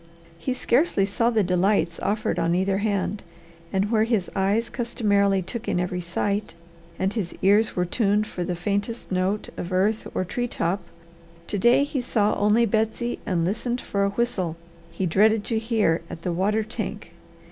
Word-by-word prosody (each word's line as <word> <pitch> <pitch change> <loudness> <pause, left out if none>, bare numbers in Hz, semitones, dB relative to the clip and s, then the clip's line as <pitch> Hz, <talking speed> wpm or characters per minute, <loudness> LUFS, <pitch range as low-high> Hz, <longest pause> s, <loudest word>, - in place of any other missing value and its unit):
He 255 +6 -2
scarcely 245 - +2
saw 230 +4 +1
the 225 -3 +2
delights 180 -1 +1
offered 205 -3 -1
on 170 +1 +2
either 190 +1 +1
hand, 205 -1 -1 0.5
and 195 +2 0
where 220 -2 +4
his 225 -5 0
eyes 200 +4 +1
customarily 200 -5 +1
took 235 +5 -6
in - - +1
every 180 0 -2
sight, 200 +3 -2 0.4
and 190 +2 0
his 200 -7 -3
ears 205 +3 +4
were 180 - +1
tuned 205 +2 +1
for 180 - -4
the 180 0 -2
faintest 205 +6 -3
note 185 +3 0
of 175 - -5
earth 200 +4 +1
or 185 - 0
tree 245 +7 -2
top, 190 -3 -1 0.6
to 205 - -2
day 240 +7 +5
he 285 -2 -2
saw 215 -4 +1
only 210 +3 +3
Betsy 225 +2 -1
and 175 -5 +1
listened 235 +6 -1
for 200 -4 -1
a 200 - +2
whistle 200 -6 -1 0.3
he 170 +3 -3
dreaded 210 +5 +3
to 225 0 -1
hear 220 -8 +1
at 165 - -8
the 175 - -1
water 210 +5 +1
tank. 220 - -6
205 Hz, 175 wpm, -24 LUFS, 185-225 Hz, 0.6 s, day